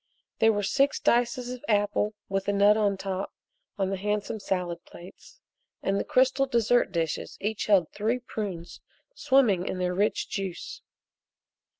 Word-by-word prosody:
There 225 Hz, -, +5 dB
were 205 Hz, -1 st, -1 dB
six 275 Hz, +8 st, +2 dB
dices 245 Hz, +1 st, +1 dB
of 250 Hz, -, -10 dB
apple 210 Hz, 0 st, +1 dB
with 195 Hz, 0 st, -2 dB
a -, -, +3 dB
nut 200 Hz, +1 st, +5 dB
on 205 Hz, -2 st, +1 dB
top 190 Hz, 0 st, -4 dB, 0.5 s
on 195 Hz, -1 st, 0 dB
the 195 Hz, -, -1 dB
handsome 210 Hz, +2 st, -2 dB
salad 180 Hz, -3 st, -3 dB
plates, 185 Hz, -, -14 dB, 0.4 s
and 195 Hz, 0 st, +1 dB
the -, -, -1 dB
crystal 265 Hz, +2 st, +2 dB
dessert 240 Hz, -3 st, +2 dB
dishes 165 Hz, -3 st, -3 dB
each 215 Hz, +1 st, -2 dB
held 195 Hz, -6 st, +4 dB
three 220 Hz, +4 st, 0 dB
prunes 205 Hz, -8 st, -6 dB, 0.3 s
swimming 235 Hz, -, +2 dB
in -, -, -3 dB
their 180 Hz, 0 st, -1 dB
rich 205 Hz, +4 st, 0 dB
juice. 195 Hz, -4 st, -5 dB
205 Hz, 155 wpm, -27 LUFS, 190-235 Hz, 0.5 s, There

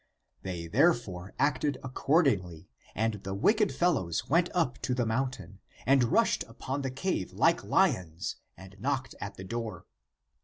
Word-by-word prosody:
They 90 Hz, -3 st, -5 dB
therefore 100 Hz, -, +1 dB
acted 145 Hz, 0 st, +1 dB
accordingly, 130 Hz, -, +1 dB, 0.3 s
and 110 Hz, -2 st, -1 dB
the 95 Hz, 0 st, -4 dB
wicked 210 Hz, -, +3 dB
fellows 135 Hz, -, 0 dB
went 170 Hz, +4 st, +3 dB
up 165 Hz, -8 st, 0 dB
to 125 Hz, -, -1 dB
the 125 Hz, -1 st, +1 dB
mountain, 125 Hz, -3 st, -3 dB, 0.3 s
and 135 Hz, -1 st, +5 dB
rushed -, -, +2 dB
upon 135 Hz, +2 st, -4 dB
the 135 Hz, -, -2 dB
cave 180 Hz, +9 st, -2 dB
like 165 Hz, +1 st, +3 dB
lions 95 Hz, -, +1 dB, 0.2 s
and 95 Hz, 0 st, -12 dB
knocked 130 Hz, +2 st, -2 dB
at 100 Hz, -, -5 dB
the 95 Hz, -, -7 dB
door. 110 Hz, -2 st, -5 dB
125 Hz, 145 wpm, -30 LUFS, 95-145 Hz, 0.3 s, and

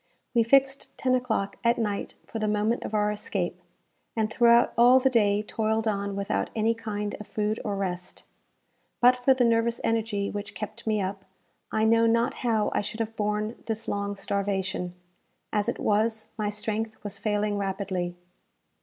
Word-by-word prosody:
We 235 Hz, -, +4 dB
fixed 270 Hz, +3 st, +3 dB
ten 255 Hz, -1 st, +1 dB
o'clock 245 Hz, -6 st, 0 dB
at 235 Hz, +1 st, +3 dB
night 210 Hz, -3 st, -2 dB
for 225 Hz, -, -5 dB
the 215 Hz, -, 0 dB
moment 210 Hz, +3 st, +1 dB
of 215 Hz, -, -4 dB
our 210 Hz, 0 st, +2 dB
escape, 210 Hz, -, -3 dB, 0.5 s
and 220 Hz, -1 st, 0 dB
throughout 235 Hz, 0 st, +5 dB
all 245 Hz, +2 st, +7 dB
the 265 Hz, 0 st, +2 dB
day 210 Hz, -3 st, +3 dB
toiled 220 Hz, +1 st, -1 dB
on 200 Hz, -1 st, -1 dB
without 200 Hz, 0 st, -1 dB
any 225 Hz, +1 st, +2 dB
kind 210 Hz, -2 st, -4 dB
of 210 Hz, -, -9 dB
food 215 Hz, 0 st, -1 dB
or 205 Hz, -2 st, -2 dB
rest. 180 Hz, -2 st, -4 dB, 0.8 s
But 250 Hz, +1 st, +6 dB
for 250 Hz, +1 st, +3 dB
the 255 Hz, -, +2 dB
nervous 230 Hz, 0 st, +2 dB
energy 220 Hz, -3 st, 0 dB
which 205 Hz, 0 st, -6 dB
kept 215 Hz, +2 st, -7 dB
me 215 Hz, -2 st, +1 dB
up, 190 Hz, +1 st, -5 dB, 0.5 s
I 220 Hz, 0 st, +2 dB
know 230 Hz, +1 st, +5 dB
not 230 Hz, +1 st, +2 dB
how 220 Hz, -4 st, +1 dB
I -, -, +1 dB
should 215 Hz, +2 st, -6 dB
have 225 Hz, 0 st, -3 dB
borne 210 Hz, +1 st, -1 dB
this 225 Hz, 0 st, -3 dB
long 200 Hz, -1 st, -2 dB
starvation; 195 Hz, -2 st, -2 dB, 0.6 s
as 210 Hz, -1 st, +1 dB
it -, -, -2 dB
was, 220 Hz, +1 st, +1 dB
my 210 Hz, -2 st, -1 dB
strength 215 Hz, +1 st, -3 dB
was 205 Hz, -, -5 dB
failing 210 Hz, -1 st, 0 dB
rapidly. 190 Hz, -3 st, -2 dB
215 Hz, 170 wpm, -27 LUFS, 205-230 Hz, 0.8 s, all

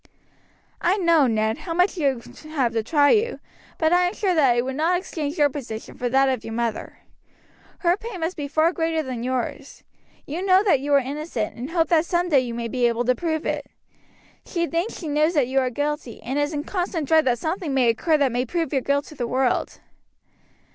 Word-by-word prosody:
"I 365 Hz, +4 st, +2 dB
know, 335 Hz, -7 st, +4 dB
Ned, 220 Hz, -1 st, 0 dB
how 330 Hz, -2 st, -5 dB
much 360 Hz, +3 st, +2 dB
you 275 Hz, -8 st, 0 dB, 0.3 s
have 270 Hz, -7 st, 0 dB
to 225 Hz, -, +1 dB
try 285 Hz, +5 st, +3 dB
you, 460 Hz, +2 st, +1 dB, 0.4 s
but 320 Hz, +1 st, +2 dB
I 355 Hz, 0 st, +4 dB
am 355 Hz, -, -4 dB
sure 385 Hz, -3 st, +1 dB
that 275 Hz, -7 st, +4 dB
I -, -, +2 dB
would 260 Hz, +1 st, -4 dB
not 330 Hz, +5 st, +2 dB
exchange 315 Hz, -4 st, -4 dB
your 295 Hz, -2 st, +5 dB
position 250 Hz, -6 st, -7 dB
for 245 Hz, -, -2 dB
that 270 Hz, +2 st, +3 dB
of 260 Hz, -4 st, -1 dB
your 225 Hz, -, -6 dB
mother. 235 Hz, -2 st, -3 dB, 0.8 s
Her 345 Hz, 0 st, +3 dB
pain 440 Hz, -5 st, -7 dB
must 330 Hz, +3 st, -2 dB
be 290 Hz, -2 st, -4 dB
far 315 Hz, +4 st, +2 dB
greater 325 Hz, -1 st, 0 dB
than 255 Hz, -4 st, -5 dB
yours. 255 Hz, 0 st, -4 dB, 0.4 s
You 315 Hz, +5 st, -4 dB
know 380 Hz, 0 st, +5 dB
that 370 Hz, -10 st, +3 dB
you 285 Hz, +2 st, -4 dB
are -, -, +6 dB
innocent, 275 Hz, -4 st, -4 dB
and 250 Hz, +4 st, -6 dB
hope 330 Hz, -2 st, +1 dB
that 330 Hz, -1 st, +3 dB
some 350 Hz, 0 st, 0 dB
day 285 Hz, -5 st, +5 dB
you 240 Hz, -2 st, -3 dB
may 235 Hz, 0 st, -3 dB
be 245 Hz, +1 st, +1 dB
able 235 Hz, +1 st, -1 dB
to 255 Hz, -, +4 dB
prove 315 Hz, +2 st, -2 dB
it. -, -, -2 dB, 0.8 s
She 340 Hz, -2 st, -2 dB
thinks 340 Hz, +6 st, -2 dB
she 330 Hz, -, -6 dB
knows 305 Hz, +3 st, +1 dB
that 280 Hz, -5 st, +3 dB
you 265 Hz, +1 st, +1 dB
are 255 Hz, -1 st, +1 dB
guilty, 290 Hz, -2 st, -3 dB
and 265 Hz, +5 st, -2 dB
is 290 Hz, +1 st, 0 dB
in 295 Hz, -2 st, -3 dB
constant 355 Hz, -4 st, -2 dB
dread 320 Hz, 0 st, +4 dB
that 245 Hz, -2 st, +2 dB
something 320 Hz, -, -3 dB
may 265 Hz, -3 st, +3 dB
occur 305 Hz, +8 st, +2 dB
that 280 Hz, -3 st, +2 dB
may 245 Hz, +1 st, 0 dB
prove 325 Hz, +3 st, -2 dB
your 270 Hz, -, +2 dB
guilt 280 Hz, +2 st, 0 dB
to -, -, -12 dB
the 245 Hz, -4 st, -3 dB
world." 255 Hz, +1 st, 0 dB
290 Hz, 225 wpm, -23 LUFS, 255-335 Hz, 0.8 s, are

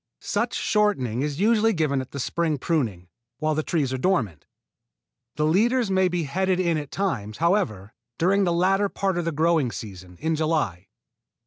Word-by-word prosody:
Such -, -, -1 dB
shortening 135 Hz, -, +1 dB
is 145 Hz, +1 st, -2 dB
usually 225 Hz, +1 st, +3 dB
given 150 Hz, -6 st, 0 dB
at 130 Hz, -, -9 dB
the 140 Hz, -, -7 dB
spring 160 Hz, +3 st, -1 dB
pruning, 120 Hz, -, -1 dB, 0.3 s
while 155 Hz, +1 st, 0 dB
the 155 Hz, -, 0 dB
trees 150 Hz, -5 st, -1 dB
are 130 Hz, -, -2 dB
dormant. 125 Hz, -, 0 dB, 0.9 s
The 150 Hz, -, 0 dB
leaders 220 Hz, +7 st, +2 dB
may 190 Hz, -1 st, +3 dB
be 175 Hz, -1 st, -1 dB
headed 185 Hz, +5 st, 0 dB
in 170 Hz, -3 st, +1 dB
at 145 Hz, -2 st, -7 dB
times, 115 Hz, -, -3 dB
however, 155 Hz, -, 0 dB, 0.2 s
during 195 Hz, +4 st, +3 dB
the 175 Hz, -, +1 dB
latter 195 Hz, +4 st, +2 dB
part 190 Hz, -3 st, -1 dB
of 175 Hz, -, -2 dB
the 165 Hz, -, 0 dB
growing 160 Hz, -4 st, +2 dB
season, 95 Hz, -5 st, -9 dB
in 160 Hz, +1 st, 0 dB
July. 150 Hz, -, -1 dB
160 Hz, 175 wpm, -24 LUFS, 130-190 Hz, 0.9 s, usually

